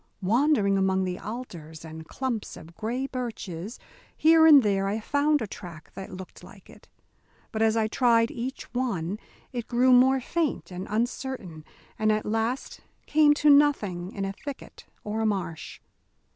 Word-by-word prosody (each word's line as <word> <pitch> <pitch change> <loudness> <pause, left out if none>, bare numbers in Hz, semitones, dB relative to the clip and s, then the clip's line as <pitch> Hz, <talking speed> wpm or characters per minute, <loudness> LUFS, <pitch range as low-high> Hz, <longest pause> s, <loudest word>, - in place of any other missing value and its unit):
Wandering 210 -2 +3
among 190 0 +2
the 180 0 -3
alders 170 -9 -8
and 160 0 -9
clumps 255 -5 -4
of 165 +2 -13
gray 240 +4 -3
birches, 225 -6 -5 0.4
here 320 0 +6
and 290 -4 +8
there 195 -2 +1
I 205 +3 -1
found 285 +4 +1
a - - -2
track 175 -5 -10
that 190 - -8
looked 185 0 -10
like - - -15
it; - - -18 0.6
but 220 - -3
as 225 0 +3
I 220 - +2
tried 230 0 +3
each 255 +3 -5
one, 210 -7 -2 0.3
it 240 -2 -4
grew 250 +1 +4
more 260 +2 +5
faint 310 - -2
and 180 +1 -6
uncertain 220 - -3 0.4
and 215 0 +3
at 215 0 0
last 225 +4 -2 0.3
came 295 -1 +4
to 295 0 +4
nothing 210 -12 +3
in 195 - -4
a 195 - -3
thicket 285 +7 -9 0.2
or 215 +1 -3
a - - +1
marsh. 190 -6 -4
220 Hz, 160 wpm, -26 LUFS, 190-260 Hz, 0.6 s, and